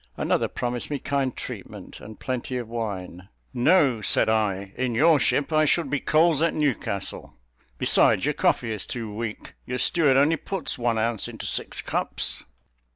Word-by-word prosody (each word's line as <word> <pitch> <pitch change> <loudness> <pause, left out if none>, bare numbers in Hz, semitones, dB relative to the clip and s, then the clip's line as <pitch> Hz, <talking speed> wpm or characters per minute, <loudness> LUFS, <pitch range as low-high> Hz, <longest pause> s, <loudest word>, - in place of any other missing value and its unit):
Another - - 0
promised 120 -1 -4
me 145 - -2
kind 135 -2 -2
treatment - - -8
and 110 0 -11
plenty 130 0 -3
of 120 -2 -5
wine. 100 -5 -6 0.2
"No," 130 -2 +3
said 105 - +2
I, 100 -3 0
"in 125 -2 -2
your 155 +3 +5
ship 140 +5 +1
I 155 0 +4
should 155 -1 +1
be 145 - +1
coals 160 0 +3
at 165 - +1
Newcastle; 125 -9 -2 0.4
besides, - - +4
your - - +1
coffee 115 - +1
is 105 -4 -3
too 115 -4 -5
weak, 110 0 -6
your 125 - -2
steward 145 0 +3
only 150 +4 +3
puts 190 -2 -3
one 120 -2 0
ounce 115 -1 0
into - - -8
six - - -2
cups." - - -1
125 Hz, 165 wpm, -25 LUFS, 110-145 Hz, 0.4 s, your